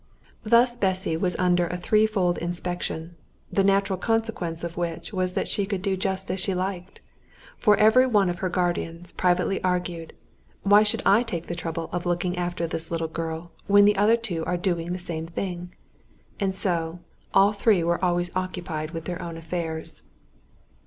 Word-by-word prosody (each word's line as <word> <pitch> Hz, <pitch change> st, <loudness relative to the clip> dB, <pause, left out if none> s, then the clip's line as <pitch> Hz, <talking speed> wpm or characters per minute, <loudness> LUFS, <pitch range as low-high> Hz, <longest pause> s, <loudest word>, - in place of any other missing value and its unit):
Thus 235 Hz, +2 st, +4 dB
Bessy 190 Hz, -4 st, 0 dB
was 180 Hz, +1 st, +1 dB
under 180 Hz, -1 st, +2 dB
a 180 Hz, -, -3 dB
threefold 200 Hz, -2 st, +2 dB
inspection, 175 Hz, -1 st, -4 dB, 0.4 s
the 195 Hz, -, +3 dB
natural 195 Hz, -1 st, +2 dB
consequence 220 Hz, -8 st, -1 dB
of 170 Hz, 0 st, -4 dB
which 170 Hz, +1 st, -4 dB
was 185 Hz, -1 st, 0 dB
that -, -, -1 dB
she 200 Hz, -1 st, -1 dB
could 195 Hz, -3 st, -3 dB
do 195 Hz, -2 st, +1 dB
just 190 Hz, 0 st, -2 dB
as 190 Hz, -, -2 dB
she 185 Hz, +1 st, 0 dB
liked, 185 Hz, 0 st, -4 dB, 0.5 s
for 210 Hz, -2 st, +4 dB
every 220 Hz, +5 st, +6 dB
one 205 Hz, -6 st, +3 dB
of 175 Hz, -1 st, -2 dB
her 185 Hz, -, -1 dB
guardians 175 Hz, -1 st, -2 dB
privately 180 Hz, +2 st, +1 dB
argued, 180 Hz, -2 st, -2 dB, 0.5 s
"Why 205 Hz, +1 st, +7 dB
should 210 Hz, -1 st, 0 dB
I 200 Hz, +4 st, +6 dB
take 175 Hz, -9 st, -4 dB
the -, -, -4 dB
trouble 165 Hz, -1 st, -4 dB
of 175 Hz, 0 st, -3 dB
looking 175 Hz, +1 st, 0 dB
after 175 Hz, -1 st, -2 dB
this 165 Hz, 0 st, -4 dB
little 165 Hz, -1 st, -1 dB
girl 165 Hz, +1 st, -5 dB, 0.2 s
when 205 Hz, +1 st, +7 dB
the 210 Hz, 0 st, +5 dB
other 210 Hz, +4 st, +4 dB
two 185 Hz, -8 st, -3 dB
are 180 Hz, -, 0 dB
doing 175 Hz, -2 st, -1 dB
the 180 Hz, -, -2 dB
same 165 Hz, -3 st, -5 dB
thing?" 175 Hz, 0 st, -5 dB, 0.7 s
and 195 Hz, -2 st, 0 dB
so 170 Hz, -3 st, -1 dB, 0.3 s
all 195 Hz, +2 st, +5 dB
three 200 Hz, -3 st, +3 dB
were 170 Hz, +2 st, 0 dB
always 175 Hz, 0 st, 0 dB
occupied 175 Hz, -4 st, -3 dB
with 165 Hz, -1 st, -5 dB
their 175 Hz, -1 st, -4 dB
own 170 Hz, -1 st, -6 dB
affairs. 165 Hz, -1 st, -5 dB
180 Hz, 175 wpm, -25 LUFS, 170-195 Hz, 0.7 s, Why